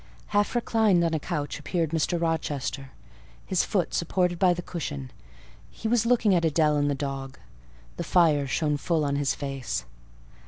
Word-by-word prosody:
Half 205 +3 +1
reclined 220 -6 +3
on 165 -1 +1
a 160 - +1
couch 150 -2 -3
appeared 165 +1 -1
Mr. 165 +2 0
Rochester, 145 -5 -2 0.6
his 185 - +1
foot 185 -5 -1
supported 175 0 0
by 185 -2 +5
the 175 0 -2
cushion; 70 - -5 0.6
he 225 - -5
was 230 0 +2
looking 230 -4 +4
at 175 - +3
Adèle 155 -2 +2
and 145 0 +1
the 145 - 0
dog: 135 -1 -5 0.6
the - - -2
fire 155 -5 +3
shone 150 +2 0
full 155 +1 0
on 140 0 0
his 140 -1 0
face. 135 - -4
160 Hz, 165 wpm, -26 LUFS, 140-180 Hz, 0.6 s, by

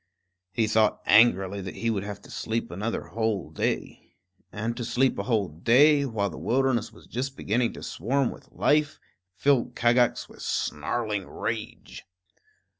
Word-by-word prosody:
He 115 +2 +1
thought 110 0 +2
angrily 100 -3 +4
that 95 0 -7
he 115 0 -1
would 100 -3 -2
have 100 0 -6
to - - -14
sleep 115 -5 -3
another 105 +6 -3
whole 110 -7 -2
day. 80 - -3 0.4
And 115 +3 -3
to 120 - -3
sleep 130 +3 +1
a - - -1
whole 110 -6 +1
day, 140 - +4
while 105 -6 -1
the - - -8
wilderness 125 -2 +1
was - - -17
just 135 +2 -4
beginning 115 +3 0
to - - -10
swarm 130 +8 -1
with - - -14
life, 150 0 +1 0.4
filled 125 -2 +2
Kagax 120 0 +2
with - - -15
snarling 105 +6 -2
rage. - - -6
115 Hz, 155 wpm, -26 LUFS, 100-125 Hz, 0.4 s, angrily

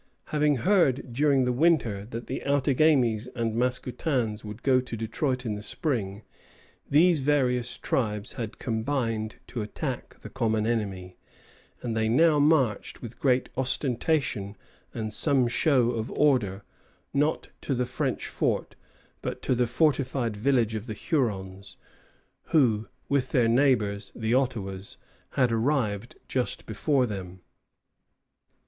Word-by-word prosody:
Having 150 -1 +2
heard 140 - +2
during 140 0 +3
the 125 - +1
winter 125 -9 +2
that 115 +1 -6
the 130 - -4
Outagamies 135 -5 +2
and 115 -2 -1
Mascoutins 125 -1 -1
would 105 +2 -8
go 130 -2 +4
to 120 -2 -6
Detroit 125 +4 -2
in 110 - -1
the 105 - -5
spring, 105 -5 -3 0.7
these 165 +3 +5
various 125 -4 +1
tribes 105 -4 -1
had 115 -4 -5
combined 115 -2 -2
to 120 - -5
attack 105 - -5
the - - -9
common 110 -2 0
enemy; 95 -6 -2 0.7
and 115 -2 -2
they 110 0 +1
now 150 +5 +4
marched 145 -8 +2
with 120 0 -9
great 125 -2 +2
ostentation 130 - -1 0.3
and 110 -1 -4
some 135 +1 +2
show 125 -1 +3
of 115 -1 -3
order, 110 -10 +2 0.5
not 145 +3 0
to 135 - -1
the 125 0 0
French 130 +1 -2
fort, - - -1 0.5
but - - -5
to - - +1
the 125 0 +1
fortified 130 -3 +1
village 115 0 +2
of 110 +2 -4
the 110 - -4
Hurons, 100 - -2 0.7
who 115 -8 +2 0.2
with 135 -2 +1
their 125 -5 +3
neighbors, 115 -5 +2
the 110 0 -1
Ottawas, 105 -7 -2 0.4
had 125 -3 +2
arrived 115 -3 0
just 125 -2 -2
before 130 +5 +1
them. 95 -4 -6
125 Hz, 130 wpm, -27 LUFS, 110-135 Hz, 0.7 s, these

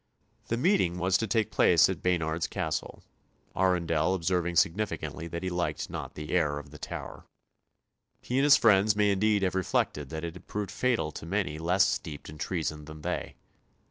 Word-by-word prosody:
The 115 - -1
meeting 130 - +2
was 90 +1 +1
to 115 - -1
take 110 +2 0
place 85 -2 +5
at 95 -4 -4
Baynard's 85 -2 0
Castle, - - -4 0.5
Arundel 90 -2 +2
observing 85 -1 0
significantly 85 -1 0
that 85 +2 -5
he 95 - -2
liked 90 0 -2
not - - -6
the 75 -1 -6
air 80 -5 +1
of 75 -1 -9
the 75 - -12
Tower. - - -7 0.9
He 125 +2 -1
and - - +3
his 145 -1 +7
friends 105 -1 +4
may 105 -1 +3
indeed 100 +1 +2
have 95 - +1
reflected 75 -6 -1
that 80 0 -5
it 85 -1 -4
had 90 - -14
proved 105 -1 -4
fatal 115 -12 0
to 80 - -9
many 90 -5 -1
less 90 +4 +3
steeped 75 -4 -4
in 75 0 -11
treason 80 -4 -3
than 80 0 -11
they. - - -3
90 Hz, 180 wpm, -28 LUFS, 80-100 Hz, 0.9 s, his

